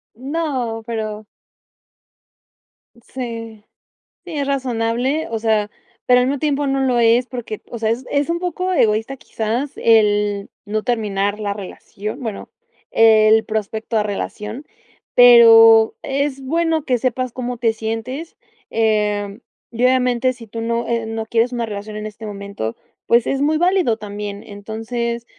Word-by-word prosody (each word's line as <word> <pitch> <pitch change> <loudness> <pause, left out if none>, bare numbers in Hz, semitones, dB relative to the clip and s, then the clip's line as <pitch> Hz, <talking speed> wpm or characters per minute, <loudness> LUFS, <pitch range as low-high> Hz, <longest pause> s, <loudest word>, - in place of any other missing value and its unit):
No, 260 -4 -3
pero 215 -2 -4 1.8
Sí. 230 -4 -7 0.6
Sí, 350 - -8
es 280 - -1
razonable, 255 +2 -1
o 225 - -2
sea, 215 -2 +1 0.3
pero 250 0 +5
al 250 - +2
mismo 280 +1 -1
tiempo 290 -1 0
no 270 0 0
lo 250 -2 +2
es 235 +2 +4
porque, 240 -4 -6
o 235 - -5
sea, 220 - 0
es 240 +3 -2
es 285 +3 0
un 340 - 0
poco 365 +1 -2
egoísta 225 -1 +1
quizás 235 +6 -3
el 210 -2 +2 0.2
no 215 +1 -2
terminar 210 -4 -1
la 205 -1 -2
relación, 205 +3 -7
bueno, 225 -5 -6 0.4
el 220 0 +5
prospecto 220 +1 -3
a 210 - +2
relación. 210 +5 -5 0.5
Pero 225 -2 +8
es 275 0 -2
bueno 325 +2 0
que 250 -2 +1
sepas 255 0 -1
cómo 250 -1 -4
te 230 -1 +1
sientes. 225 +8 -5 0.3
Eh, 210 -2 0 0.3
y, 235 +1 -3
obviamente 255 0 +2
si 235 -3 -13
tú, 230 +2 -7 0.3
eh, 230 -1 -1
no 225 0 -4
quieres 230 +2 +1
una 235 -1 -1
relación 210 0 -7
en 215 0 -5
este 215 +1 -8
momento, 200 - -5 0.3
pues, 235 0 +4
es 275 0 -1
muy 310 +2 +2
válido 350 - +2
también. 205 -1 -6
Entonces 225 +3 -5
230 Hz, 145 wpm, -19 LUFS, 215-255 Hz, 1.8 s, Pero